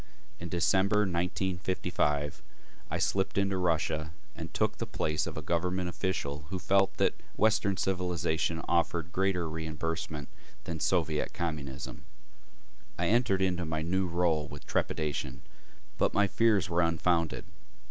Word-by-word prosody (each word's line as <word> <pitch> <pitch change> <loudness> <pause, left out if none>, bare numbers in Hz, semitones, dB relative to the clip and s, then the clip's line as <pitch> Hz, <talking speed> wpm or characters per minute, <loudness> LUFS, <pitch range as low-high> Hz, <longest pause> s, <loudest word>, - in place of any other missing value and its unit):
In 85 - -5
December 95 +4 +3
1955, 90 -5 0 0.5
I - - -1
slipped 95 0 +1
into 100 -1 +2
Russia 80 -3 +1 0.3
and - - -6
took - - 0
the - - -2
place 75 0 -1
of - - -5
a - - -4
government 90 +1 0
official 75 -6 -2
who 95 - -2
felt 95 +1 +2
that - - +3 0.2
Western 105 -3 +3
civilization 85 -3 0
offered 85 0 +1
greater 95 -3 +1
reimbursement 80 -2 -3 0.4
than 85 -2 -4
Soviet 80 -4 +1
Communism. 70 -5 -4 0.9
I - - +1
entered 110 -4 +3
into 90 -2 +1
my 80 -1 -2
new 95 +3 +1
role 85 -3 +1
with 75 - -10
trepidation, 70 -4 -1 0.6
but - - +2
my 100 - +5
fears 105 -3 +3
were 85 0 +2
unfounded. 85 0 +1
85 Hz, 130 wpm, -30 LUFS, 80-95 Hz, 0.9 s, my